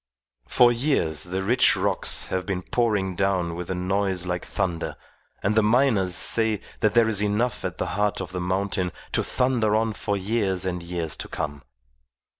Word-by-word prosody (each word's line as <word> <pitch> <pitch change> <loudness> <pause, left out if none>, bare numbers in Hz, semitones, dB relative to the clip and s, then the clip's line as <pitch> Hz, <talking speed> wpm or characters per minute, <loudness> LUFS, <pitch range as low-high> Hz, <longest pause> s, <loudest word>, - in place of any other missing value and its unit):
For 120 -1 +5
years 120 - 0
the 95 +2 -3
rich 125 +5 +4
rocks - - +2
have 95 0 -1
been 90 -1 -3
pouring 105 -6 0
down 95 -3 0
with 85 0 -6
a 95 - -1
noise 95 0 -1
like 90 0 -3
thunder, 85 -2 -3 0.5
and 100 - +2
the 110 - +4
miners 105 -5 +2
say 110 0 +2 0.2
that 105 0 +1
there 115 -1 +5
is 105 -2 +3
enough 105 +4 0
at 90 -1 -4
the - - -1
heart 105 0 0
of 95 -2 -6
the 90 -1 -4
mountain 95 0 -1 0.2
to - - +1
thunder 120 -4 +1
on 110 0 +1
for 100 0 -2
years 95 -2 -1
and 90 -1 -2
years 85 -3 -4
to - - -5
come. 75 -3 -5
95 Hz, 180 wpm, -24 LUFS, 90-110 Hz, 0.5 s, For